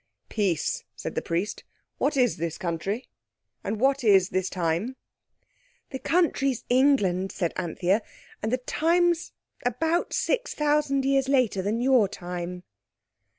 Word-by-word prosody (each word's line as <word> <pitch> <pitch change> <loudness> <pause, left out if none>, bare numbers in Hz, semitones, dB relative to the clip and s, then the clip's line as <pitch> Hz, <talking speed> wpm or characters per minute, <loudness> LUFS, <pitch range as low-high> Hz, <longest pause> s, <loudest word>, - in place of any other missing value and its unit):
_" - - -45
"Peace," 195 -8 0
said - - -5
the - - -1
Priest. 175 +5 -2 0.4
"What 285 0 +1
is 245 -9 +3
this 165 -1 -3
country? 185 +7 -3 0.6
and 210 +1 -3
what 270 +2 +2
is 195 -4 +5
this 185 0 -1
time?" 180 +8 -1 1.0
"The 265 - -4
country's 275 -8 +1
England," 205 -9 +3
said 170 -3 -2
Anthea, 180 +4 0 0.4
"and 220 - -1
the 255 - +2
time's 340 +6 +1 0.3
about 320 +8 0
6,000 300 - +1
years 270 -1 +2
later 250 -8 +2
than 210 +5 -1
your 250 -5 +4
time." 180 -1 -6
230 Hz, 130 wpm, -26 LUFS, 185-275 Hz, 1.0 s, is